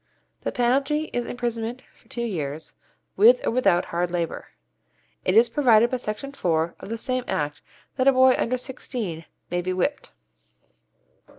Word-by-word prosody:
The -, -, -2 dB
penalty 275 Hz, +5 st, +1 dB
is 240 Hz, -1 st, -2 dB
imprisonment 240 Hz, 0 st, -3 dB
for -, -, -27 dB
two 235 Hz, -, -4 dB
years, 155 Hz, -8 st, -4 dB, 0.4 s
with 485 Hz, +4 st, +6 dB
or -, -, +1 dB
without 230 Hz, -8 st, +2 dB
hard 175 Hz, +1 st, -1 dB
labour. 170 Hz, -1 st, -3 dB, 0.8 s
It 185 Hz, -, +2 dB
is 235 Hz, +1 st, +7 dB
provided 235 Hz, -2 st, +4 dB
by 255 Hz, -, 0 dB
Section 240 Hz, +3 st, -5 dB
4 170 Hz, -9 st, 0 dB
of -, -, -9 dB
the 230 Hz, -, -3 dB
same 255 Hz, +2 st, -2 dB
Act 145 Hz, 0 st, -2 dB, 0.4 s
that 260 Hz, 0 st, +2 dB
a -, -, +9 dB
boy 260 Hz, 0 st, +6 dB
under 255 Hz, +2 st, 0 dB
sixteen 235 Hz, -10 st, -5 dB, 0.3 s
may 175 Hz, 0 st, 0 dB
be 185 Hz, +1 st, -2 dB
whipped. 235 Hz, +11 st, -1 dB
235 Hz, 160 wpm, -24 LUFS, 175-255 Hz, 0.8 s, a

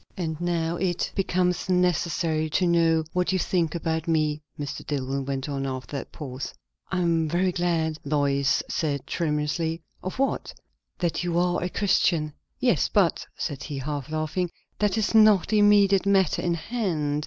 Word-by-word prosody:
"And 160 Hz, -3 st, -3 dB
now 170 Hz, -1 st, 0 dB
it 175 Hz, -1 st, -1 dB
becomes 180 Hz, -1 st, 0 dB
necessary 170 Hz, -3 st, +1 dB
to 180 Hz, +4 st, +1 dB
know 165 Hz, -2 st, +3 dB
what 180 Hz, +1 st, +1 dB
you 190 Hz, -, +2 dB
think 175 Hz, -2 st, 0 dB
about 160 Hz, -1 st, -2 dB
me," 155 Hz, -2 st, +1 dB, 0.2 s
Mr. 145 Hz, -2 st, -5 dB
Dillwyn 135 Hz, -1 st, -2 dB
went 135 Hz, 0 st, -2 dB
on, 135 Hz, -1 st, -2 dB
after 130 Hz, +2 st, -5 dB
that 140 Hz, -, -5 dB
pause. 140 Hz, -3 st, -6 dB, 0.4 s
"I 185 Hz, -1 st, 0 dB
am 165 Hz, -2 st, +1 dB
very 180 Hz, +3 st, +1 dB
glad 165 Hz, -3 st, 0 dB
" -, -, -38 dB
Lois 140 Hz, -1 st, +1 dB
said 145 Hz, -4 st, -2 dB
tremulously. 160 Hz, +1 st, -1 dB, 0.2 s
"Of 185 Hz, -, -5 dB
what?" 275 Hz, +1 st, -1 dB, 0.4 s
"That 175 Hz, -1 st, -1 dB
you 175 Hz, -1 st, -1 dB
are 175 Hz, 0 st, +1 dB
a 180 Hz, -, -1 dB
Christian." 170 Hz, -6 st, +1 dB, 0.3 s
"Yes, 240 Hz, -, +2 dB
but," 195 Hz, -5 st, +2 dB
said 145 Hz, -4 st, -3 dB
he, 145 Hz, -2 st, -5 dB
half 145 Hz, +1 st, -4 dB
laughing, 155 Hz, +3 st, -1 dB, 0.3 s
"that 210 Hz, 0 st, +1 dB
is 220 Hz, 0 st, 0 dB
not 215 Hz, -4 st, +6 dB
the 215 Hz, -, +3 dB
immediate 200 Hz, -2 st, +5 dB
matter 190 Hz, -4 st, +3 dB
in 170 Hz, -1 st, 0 dB
hand. 160 Hz, -7 st, -1 dB
165 Hz, 165 wpm, -26 LUFS, 150-180 Hz, 0.4 s, not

